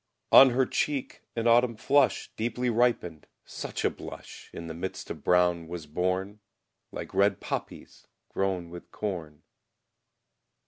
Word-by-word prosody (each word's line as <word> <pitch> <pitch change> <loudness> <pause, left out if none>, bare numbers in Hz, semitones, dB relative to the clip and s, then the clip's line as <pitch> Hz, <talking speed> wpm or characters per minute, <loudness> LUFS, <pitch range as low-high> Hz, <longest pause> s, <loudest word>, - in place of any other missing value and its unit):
On 135 - +10
her 130 +1 +2
cheek 140 -1 -2
an 115 -1 -2
autumn 120 0 +4
flush, 135 +5 +2
Deeply 120 +2 -1
ripened; 115 -9 0 0.2
such - - -5
a - - +4
blush - - -10
In 85 - -8
the 80 - -6
midst 90 +3 -6
of - - -8
brown 90 -2 +2
was 85 -2 -6
born, 95 +6 -2 0.5
Like - - -7
red 100 0 +3
poppies - - -6 0.2
grown 95 -3 -2
with 85 0 -10
corn. 85 -8 -5
95 Hz, 135 wpm, -28 LUFS, 85-120 Hz, 0.5 s, On